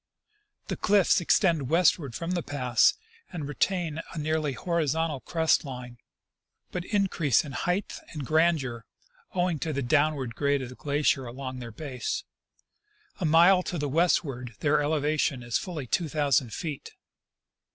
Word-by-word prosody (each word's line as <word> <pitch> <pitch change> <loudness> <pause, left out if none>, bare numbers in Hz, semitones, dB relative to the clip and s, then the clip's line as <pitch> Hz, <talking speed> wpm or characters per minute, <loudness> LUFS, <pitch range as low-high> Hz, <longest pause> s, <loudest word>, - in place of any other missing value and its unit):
The - - -2
cliffs 200 -3 +3
extend 165 - +2
westward 165 -6 +2
from 170 +1 -3
the 180 -1 0
pass, 125 -5 +2 0.4
and 160 -6 -5
retain 165 +1 -1
a - - -8
nearly 155 -1 -1
horizontal 160 -2 -1
crest 160 +3 +1
line, 125 -4 -8 0.7
but 180 - -3
in 205 -2 +1
crease 155 - +1
in 145 - -7
height 180 +8 -2
and 150 -4 -5
grandeur, 155 -7 +1 0.5
owing 175 -3 +1
to 160 - -2
the 140 -2 -2
downward 145 -2 +1
grade 140 +1 0
of 125 - -6
the 130 - -10
glacier 140 -2 0
along 130 +1 -6
their 120 -1 -7
base. 130 0 -4 1.0
A 180 - -1
mile 170 +4 +6
to 180 - -4
the 145 -1 -1
westward 135 -6 0
their 150 0 +3
elevation 145 -3 0
is 120 -1 0
fully 165 -7 -5
two 160 +6 -1
thousand 140 -5 +1
feet. 150 +1 -6
150 Hz, 150 wpm, -27 LUFS, 130-170 Hz, 1.0 s, mile